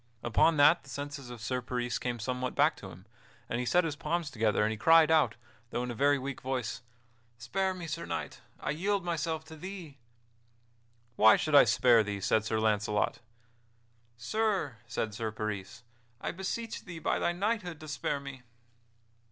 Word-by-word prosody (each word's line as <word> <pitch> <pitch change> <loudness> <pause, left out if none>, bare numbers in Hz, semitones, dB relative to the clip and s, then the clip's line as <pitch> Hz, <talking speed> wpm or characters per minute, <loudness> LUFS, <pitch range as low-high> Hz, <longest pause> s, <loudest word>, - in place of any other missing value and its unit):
Upon 150 +7 +3
that 150 +4 +6
the 135 - -17
senses 140 -1 -6
of 120 -2 -9
Sir 125 +2 -2
Peris 125 -1 -2
came 125 -1 -2
somewhat 125 +3 -3
back 155 - +4
to 95 - -9
him, 90 +1 -13 0.4
and 120 - -2
he 125 - -2
set 180 - +4
his 160 -3 -2
palms 165 0 -2
together 110 -3 +1
and 110 - +1
he - - -2
cried 160 +6 +6
out, 150 -8 +4 0.3
though 120 - -2
in 125 - -3
a - - -4
very 140 +4 +3
weak 135 0 -5
voice: 130 -3 -3 0.6
"Spare 190 +11 -1
me, 175 -2 -7
Sir 165 +1 -5
Knight! - - -5 0.2
I - - -2
yield 190 +4 -1
myself 160 -1 -2
to 160 - -11
thee!" 170 -4 -8 1.2
"Why 110 +1 +8
should 155 - -2
I 145 - +9
spare 120 -3 +5
thee?" 105 -1 -3
said 105 +2 +1
Sir 110 0 0
Launcelot. 105 -1 +1 1.0
"Sir," 190 - -1
said 115 -1 -3
Sir 110 +1 -3
Peris, 105 0 -5 0.4
"I - - -3
beseech 205 +5 -4
thee, 175 -4 -8
by 160 - 0
thy - - +1
knighthood, 180 -3 -2
to 155 - -9
spare 145 -1 -2
me." 140 -2 -9
140 Hz, 180 wpm, -30 LUFS, 115-165 Hz, 1.2 s, I